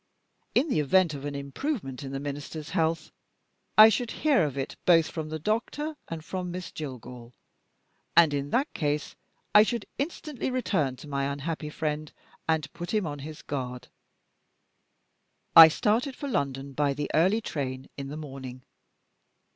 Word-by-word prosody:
In 300 - +4
the 205 - +2
event, 170 +3 +3
of 140 0 -6
an 145 -1 -4
improvement 140 - -4
in 135 -2 -6
the 135 - -3
Minister's 145 +2 -6
health, 165 -2 0 0.7
I 215 +1 +11
should 240 +1 -1
hear 290 - +2
of 140 -2 -4
it 135 - -3
both 165 -3 +5
from 155 -2 -4
the 155 - -3
doctor 235 - -2
and 160 -1 -6
from 180 0 -4
Miss 180 0 -6
Jillgall, 125 -4 -8 0.8
and 165 -4 +7
in 140 0 -2
that 270 - 0
case 150 -1 -2 0.4
I 210 - +9
should 230 0 0
instantly 295 -2 -3
return 190 - 0
to 150 - -12
my 140 -1 -1
unhappy 150 +2 -4
friend 150 0 -3 0.4
and 160 -2 0
put 175 +4 -4
him 210 -4 +1
on 145 -2 -4
his 150 +2 -8
guard. 125 -3 -5 1.7
I 165 -1 +13
started 225 - +1
for 285 - -5
London 140 - -2
by 140 0 +1
the 145 +1 -3
early 185 +8 +4
train 135 -9 -4
in 140 -1 -6
the 145 +2 -6
morning. 130 -4 -8
155 Hz, 160 wpm, -28 LUFS, 140-190 Hz, 1.7 s, I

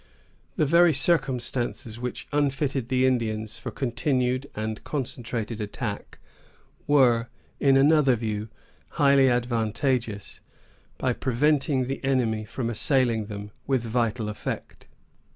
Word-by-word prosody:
The 155 - +2
very 170 +2 +5
circumstances 125 -7 0
which 125 0 -5
unfitted 135 -3 0
the 130 0 +2
Indians 110 -3 -1
for - - -5
continued 130 0 -1
and 110 0 -4
concentrated 115 -5 -4
attack 105 0 -5 0.7
were, 125 -5 +4 0.3
in 135 -1 +4
another 140 -2 +5
view, 110 -1 -3 0.5
highly 140 -2 +5
advantageous, 120 -2 -1 0.6
by 130 -1 0
preventing 135 +1 +1
the 135 +2 -5
enemy 120 -5 +1
from 115 +2 -3
assailing 120 -2 +1
them 105 -1 -7 0.2
with 130 -3 +1
vital 115 -1 -1
effect. 105 - -6
125 Hz, 110 wpm, -26 LUFS, 115-135 Hz, 0.7 s, very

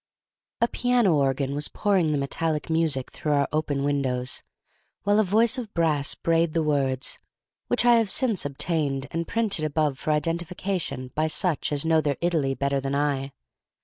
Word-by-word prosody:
A 235 - +4
piano 245 -7 +2
organ 135 -1 +1
was 145 +1 -1
pouring 190 -6 +1
the 150 - +1
metallic 155 +3 -2
music 160 -5 0
through 150 - -2
our 140 -1 +2
open 150 -2 -1
windows, 130 -3 -1 0.6
while 205 +1 +3
a - - +5
voice 225 +6 +2
of 225 -4 -7
brass 155 -4 +1
brayed 165 -1 +1
the 165 - +1
words, 135 -3 -1 0.5
which - - +1
I 240 -1 +6
have 225 -3 +1
since 225 -2 +2
obtained, 145 -1 -2
and 165 0 -3
print 225 -6 +1
above 150 -2 0
for - - -4
identification 165 -3 -2
by 155 +1 0
such 155 +1 +1
as 145 +1 0
know 160 -1 +3
their 145 -3 -1
Italy 160 -6 0
better 140 0 0
than 135 +1 -3
I. 140 -1 -1
155 Hz, 170 wpm, -25 LUFS, 140-175 Hz, 0.6 s, I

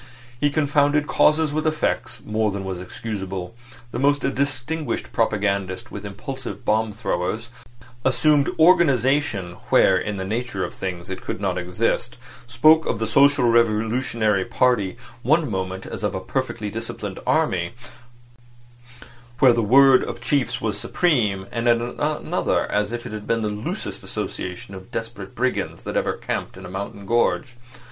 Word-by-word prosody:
He 145 - +3
confounded 145 0 +2
causes 150 0 +3
with 155 +1 0
effects 155 0 -1
more 110 0 +1
than 100 -1 -4
was 95 -2 -4
excusable; 95 -1 -5 0.4
the - - -3
most 145 +2 +3
distinguished 145 +3 -2
propagandists 100 -4 0
with 105 0 -6
impulsive 130 +7 -7
bomb 110 0 +2
throwers; 105 +1 -2 0.5
assumed 145 +2 +3
organisation 140 - +3
where 95 - +5
in 105 +1 -3
the 95 - -3
nature 110 -2 -2
of - - -7
things 90 -1 -5
it 95 - -5
could - - -4
not 95 -3 -1
exist; 105 +6 -1 0.3
spoke 155 +7 +5
of - - 0
the 110 - -1
social 140 +2 +4
revolutionary 115 -2 +2
party 105 -5 +1 0.2
one 155 +6 +3
moment 95 -1 -3
as - - -6
of - - -1
a - - -1
perfectly - - -3
disciplined - - -5
army, 85 +2 +1 1.6
where 130 -1 +6
the 115 - +1
word 130 +4 +6
of - - -5
chiefs 135 +2 0
was 105 -2 -2
supreme, 105 - +1
and 115 +1 0
at 120 - +5
another 145 +6 -1
as 105 +1 0
if 120 0 -5
it - - -6
had 105 -1 -7
been 115 -1 +1
the 105 - 0
loosest 105 +1 -5
association 95 +1 -5
of 95 +3 -10
desperate 115 -5 -6
brigands 130 +2 -1
that - - -5
ever - - +1
camped - - -4
in 95 - -9
a - - -8
mountain 100 +1 -6
gorge. 120 +1 +1
115 Hz, 155 wpm, -23 LUFS, 100-135 Hz, 1.6 s, where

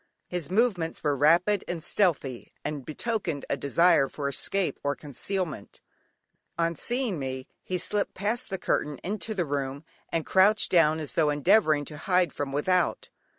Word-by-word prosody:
His 175 -4 -4
movements 190 -5 0
were 145 -2 +1
rapid 175 +8 +3
and 170 -3 -4
stealthy, 145 - 0
and 145 -3 -4
betokened 165 - -3
a - - +2
desire 140 +1 +3
for 145 -2 -4
escape 180 +7 0
or 145 0 0
concealment. 155 - -4 0.8
On 170 0 0
seeing 240 - -1
me 130 -1 -4 0.2
he 185 - -3
slipped 205 +3 -1
past 215 +5 -2
the 190 - -2
curtain 150 -5 -1
into 215 +3 -4
the 180 -3 0
room, 140 0 -3 0.3
and 165 -2 -1
crouched 200 +3 +5
down, 160 -3 +4
as 155 - -4
tho' 155 -2 +2
endeavouring 155 0 +3
to 150 - -7
hide 180 0 +2
himself - - -18
from 140 -1 -3
without. 170 +4 0
165 Hz, 160 wpm, -27 LUFS, 145-190 Hz, 0.8 s, crouched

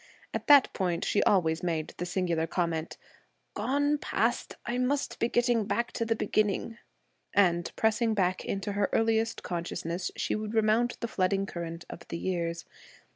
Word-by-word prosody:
At - - -4
that 285 -2 +7
point, 180 -3 -1
she - - +2
always 165 -5 +2
made 165 -3 -2
the 175 - -3
singular 170 -3 0
comment, 165 -2 -2 0.6
'Gone 285 +2 +1
past! - - -1
I 245 +1 -1
must 275 +3 -1
be 235 - +1
getting 240 -3 +2
back 235 +3 -1
to 230 - -2
the 225 0 +1
beginning,' 215 +2 0 0.6
and, 175 -4 +3
pressing 220 0 +2
back 185 -2 +1
into 200 +1 -3
her 200 0 0
earliest 225 0 +1
consciousness, 170 0 -3
she - - -1
would 215 +1 -3
remount 220 +2 +2
the 235 - -1
flooding 195 -1 +1
current 170 -2 -6
of 170 - -10
the 170 - -4
years. 170 -2 -2
195 Hz, 160 wpm, -29 LUFS, 170-225 Hz, 0.6 s, that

